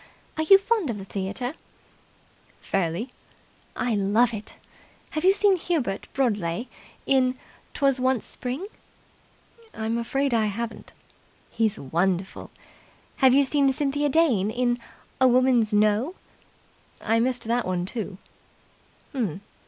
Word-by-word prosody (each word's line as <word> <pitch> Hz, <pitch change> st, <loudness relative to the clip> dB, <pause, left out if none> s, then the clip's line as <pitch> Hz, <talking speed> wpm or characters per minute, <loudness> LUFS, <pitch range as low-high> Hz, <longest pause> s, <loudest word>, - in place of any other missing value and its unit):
Are 315 Hz, -, -1 dB
you 390 Hz, +5 st, +8 dB
fond 400 Hz, -, 0 dB
of 225 Hz, -, -2 dB
the 195 Hz, -, -8 dB
theatre?" 200 Hz, +7 st, -3 dB, 1.1 s
"Fairly." 195 Hz, +6 st, -2 dB, 0.6 s
"I 245 Hz, -, -1 dB
love 215 Hz, +4 st, +2 dB
it. 215 Hz, -1 st, -7 dB, 0.6 s
Have 310 Hz, -, -3 dB
you 375 Hz, -, +7 dB
seen 400 Hz, -1 st, +3 dB
Hubert 295 Hz, -, -2 dB
Broadleigh 210 Hz, -6 st, -1 dB, 0.4 s
in 255 Hz, -1 st, +2 dB, 0.4 s
''Twas 275 Hz, -2 st, +2 dB
Once 255 Hz, -2 st, +1 dB
in -, -, -12 dB
Spring'?" 260 Hz, +10 st, -4 dB, 1.1 s
"I'm 225 Hz, +1 st, -2 dB
afraid 270 Hz, +3 st, -1 dB
I 225 Hz, -2 st, +3 dB
haven't." 230 Hz, +3 st, -5 dB, 0.6 s
"He's 220 Hz, -2 st, 0 dB
wonderful. 180 Hz, +6 st, -1 dB, 0.7 s
Have 265 Hz, -2 st, +5 dB
you 280 Hz, -, +6 dB
seen 275 Hz, 0 st, +2 dB
Cynthia 290 Hz, +2 st, 0 dB
Dane 260 Hz, -, +3 dB
in 240 Hz, +1 st, 0 dB, 0.4 s
'A 260 Hz, -, +6 dB
Woman's 250 Hz, -3 st, +3 dB
No'?" 215 Hz, -, +2 dB, 0.8 s
"I 225 Hz, +1 st, +1 dB
missed 250 Hz, +1 st, 0 dB
that 235 Hz, 0 st, 0 dB
one 180 Hz, -1 st, -1 dB
too." 205 Hz, -2 st, -5 dB
240 Hz, 120 wpm, -25 LUFS, 210-270 Hz, 1.1 s, you